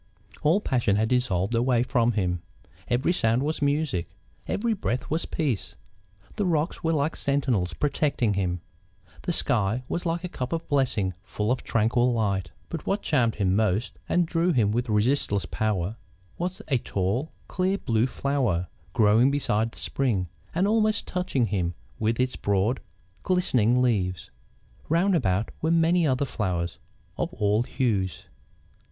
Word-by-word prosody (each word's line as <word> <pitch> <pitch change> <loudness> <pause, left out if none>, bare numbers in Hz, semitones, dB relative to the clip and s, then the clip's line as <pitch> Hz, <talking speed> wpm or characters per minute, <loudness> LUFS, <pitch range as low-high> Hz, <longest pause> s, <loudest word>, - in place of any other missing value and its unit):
All 160 +7 +4
passion 120 - +1
had 110 +2 +1
dissolved 120 -6 +1
away 120 0 +3
from 120 -1 +2
him; 90 -4 0 0.5
every 125 +8 +2
sound 115 -4 +2
was 155 +1 -2
music; 140 - 0 0.4
every 230 +2 0
breath 130 - -3
was 160 +2 0
peace; 140 - -2 0.6
the 205 - +1
rocks 165 +1 0
were 165 - +2
like 155 +1 0
sentinels 130 -11 0
protecting 140 -6 +1
him; 90 -3 -1 0.6
the - - -2
sky 115 - +1
was 175 - -2
like 170 +1 -1
a - - -2
cup 130 -5 -4
of 165 0 -3
blessing 130 -10 +1
full 105 +1 -2
of 125 - 0
tranquil 120 +3 +2
light. 100 -6 0 0.2
But 165 -3 -6
what 200 +2 0
charmed 125 -7 +2
him 95 -2 +1
most, 105 +1 0
and 175 -1 +3
drew 165 +2 +1
him 110 -9 +2
with 120 +2 -1
resistless 105 -2 +2
power, 105 -1 -1 0.4
was 180 +2 -4
a 135 -5 +2
tall, 100 - -1 0.2
clear 185 +2 0
blue 115 - +1
flower, 125 -12 0 0.2
growing 110 +4 +5
beside 115 -6 +1
the - - -17
spring, 105 -10 -1 0.3
and 185 +4 +2
almost 215 0 +2
touching 180 -9 0
him 90 -4 -1 0.2
with 115 +2 0
its 125 0 +1
broad, 100 +5 +1 0.4
glistening 125 - +2
leaves. 95 -7 0 0.6
Round 180 +4 +3
about 95 - +1
were 160 - +1
many 165 0 +3
other 130 +1 +1
flowers, 90 -8 -2 0.4
of - - -1
all 105 +1 +2
hues. 110 -7 -1
125 Hz, 150 wpm, -26 LUFS, 105-155 Hz, 0.6 s, growing